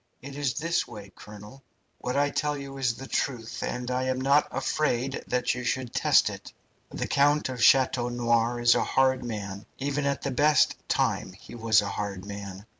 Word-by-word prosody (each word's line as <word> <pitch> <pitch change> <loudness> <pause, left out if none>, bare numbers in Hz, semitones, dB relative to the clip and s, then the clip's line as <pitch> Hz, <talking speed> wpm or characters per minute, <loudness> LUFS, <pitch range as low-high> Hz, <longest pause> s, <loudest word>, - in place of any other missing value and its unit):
It 140 0 -8
is 140 -3 -1
this 165 +3 0
way, 105 -4 -10
colonel. 105 +5 -12 0.4
What 125 +2 -3
I 145 0 +2
tell 150 +1 -1
you 135 -1 -8
is 125 -3 +1
the 135 - -9
truth, 120 -6 -3
and 125 0 -3
I 130 +1 0
am 130 0 -1
not 140 +3 +3
afraid 135 -1 -1
that 125 0 0
you 125 +1 -5
should 125 0 -2
test - - +4
it. - - -10 0.4
The - - -4
Count 145 0 +2
of 125 -2 -3
Chateau 125 -1 +4
Noir 120 0 +1
is 120 0 +5
a - - +1
hard 130 -1 +2
man, 100 -4 -6
even 140 +1 -1
at 140 -2 -2
the 140 - -1
best 145 +2 +3
time 95 - 0
he 95 - -14
was 110 -2 +3
a - - -3
hard 100 -2 -4
man. 100 -1 -8
125 Hz, 190 wpm, -27 LUFS, 115-135 Hz, 0.4 s, is